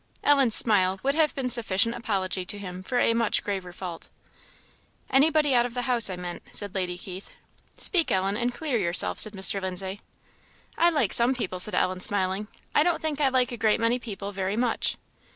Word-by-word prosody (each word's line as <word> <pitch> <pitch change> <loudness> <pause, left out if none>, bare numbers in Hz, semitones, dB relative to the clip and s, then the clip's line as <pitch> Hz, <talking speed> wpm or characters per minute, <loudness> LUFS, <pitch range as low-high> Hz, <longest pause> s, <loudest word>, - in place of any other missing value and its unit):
Ellen's 275 -6 +4
smile 190 -4 +2
would 275 +1 +1
have 310 -1 +1
been 270 - -4
a - - -1
sufficient 230 -1 +3
apology 195 -5 -2
to 205 - -3
him 185 -2 -8
for 245 +6 -4
a 230 - +2
much 230 -1 0
graver 190 -3 -5
fault. 175 -2 -8 1.0
"Anybody 295 +1 +3
out 240 -1 +3
of 240 - -13
the 245 - -3
house, 245 -4 +2
I 185 - -4
meant," 180 -1 -7
said 205 -2 -3
Lady 180 -2 -3
Keith. 185 +1 -9 0.5
"Speak, 345 -4 +2
Ellen, 195 +1 0
and 240 +2 -1
clear 265 -2 -3
yourself," 175 -2 +1
said 215 - +2
Mr. 195 0 +2
Lindsay. 190 +2 -4 0.7
"I 340 - +3
like 290 - 0
some 240 +3 +4
people," 185 -7 -4
said 210 +4 +8
Ellen, 185 0 0
smiling; 195 +1 -1 0.3
"I - - +4
don't 345 +2 +1
think 300 -2 -3
I 275 - +3
like 255 0 +1
a 240 - -6
great 215 -1 +1
many 230 +2 0
people 205 -4 -7
very 195 0 -3
much." 240 -1 0
215 Hz, 200 wpm, -25 LUFS, 190-250 Hz, 1.0 s, said